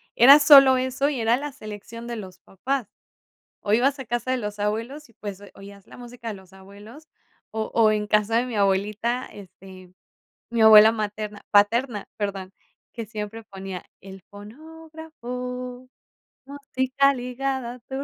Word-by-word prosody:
era 275 Hz, +5 st, +8 dB
solo 275 Hz, -3 st, +8 dB
eso 260 Hz, +2 st, -1 dB
y 270 Hz, -5 st, -3 dB
era 225 Hz, +2 st, +2 dB
la 290 Hz, +2 st, -6 dB
selección 225 Hz, -1 st, -10 dB
de 240 Hz, -, -5 dB
los 190 Hz, -4 st, -10 dB
papás. 255 Hz, +5 st, -4 dB, 0.7 s
O 205 Hz, -, 0 dB
ibas 270 Hz, +5 st, +2 dB
a 265 Hz, -, -8 dB
casa 240 Hz, +2 st, -3 dB
de 260 Hz, -, 0 dB
los 210 Hz, -2 st, -6 dB
abuelos 230 Hz, +8 st, -4 dB
y -, -, -23 dB
pues 200 Hz, -3 st, -8 dB
o -, -, -11 dB
oías 200 Hz, 0 st, -14 dB
la -, -, -15 dB
música 240 Hz, -1 st, -9 dB
de 220 Hz, -, -4 dB
los 190 Hz, -1 st, -16 dB
abuelos 205 Hz, +10 st, -15 dB, 0.4 s
o 220 Hz, 0 st, -4 dB
o 225 Hz, -2 st, +4 dB
en 210 Hz, -1 st, -1 dB
casa 210 Hz, +1 st, +1 dB
de 245 Hz, -, -1 dB
mi 240 Hz, -3 st, -5 dB
abuelita, 210 Hz, +5 st, 0 dB
este, 185 Hz, -2 st, -14 dB, 0.6 s
mi 235 Hz, -1 st, +1 dB
abuela 220 Hz, 0 st, +9 dB
materna 210 Hz, -1 st, -5 dB
paterna, 210 Hz, +2 st, +2 dB
perdón, 195 Hz, -2 st, -5 dB, 0.4 s
que 230 Hz, -2 st, -7 dB
siempre 220 Hz, +1 st, -7 dB
ponía 190 Hz, -3 st, -8 dB, 0.2 s
el 195 Hz, 0 st, -12 dB
fonógrafo, 250 Hz, -, -9 dB, 0.6 s
música 275 Hz, -1 st, 0 dB
ligada 250 Hz, 0 st, -4 dB
a -, -, -16 dB
tu 265 Hz, +3 st, -6 dB
230 Hz, 160 wpm, -24 LUFS, 205-260 Hz, 0.7 s, abuela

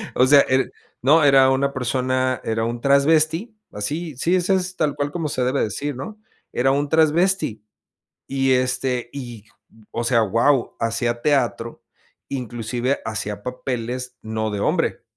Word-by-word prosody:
O 130 Hz, -, +5 dB
sea, 140 Hz, +1 st, +7 dB
er 130 Hz, 0 st, +1 dB, 0.3 s
no, 150 Hz, +5 st, +5 dB
era 135 Hz, -2 st, +6 dB
una 140 Hz, +1 st, +1 dB
persona 130 Hz, 0 st, -1 dB
era 115 Hz, 0 st, -1 dB
un 120 Hz, 0 st, -4 dB
trasvesti, 155 Hz, -, +2 dB, 0.2 s
así, 150 Hz, +9 st, -4 dB
sí, 170 Hz, +7 st, +1 dB
ese 185 Hz, +1 st, +2 dB
es, 185 Hz, 0 st, -2 dB
tal 150 Hz, -3 st, 0 dB
cual 145 Hz, 0 st, -2 dB
como 160 Hz, -1 st, -3 dB
se 130 Hz, -, -1 dB
debe 130 Hz, +2 st, +1 dB
decir, 140 Hz, +7 st, -3 dB
¿no?, 210 Hz, -, -8 dB, 0.3 s
era 135 Hz, +2 st, +2 dB
un 145 Hz, +1 st, 0 dB
trasvesti 160 Hz, -, +2 dB, 0.6 s
y 135 Hz, -1 st, +1 dB
este 125 Hz, -1 st, 0 dB
y, 120 Hz, -6 st, -8 dB, 0.5 s
o 120 Hz, -, -3 dB
sea, 115 Hz, -1 st, +3 dB
wao, 115 Hz, +5 st, +1 dB
hacía 120 Hz, +1 st, -1 dB
teatro, 120 Hz, -5 st, 0 dB, 0.5 s
inclusive 125 Hz, 0 st, -2 dB
hacía 105 Hz, -2 st, -4 dB
papeles, 125 Hz, 0 st, -4 dB
no 110 Hz, 0 st, -3 dB
de 105 Hz, -1 st, -3 dB
hombre. -, -, 0 dB
130 Hz, 150 wpm, -22 LUFS, 120-145 Hz, 0.6 s, sea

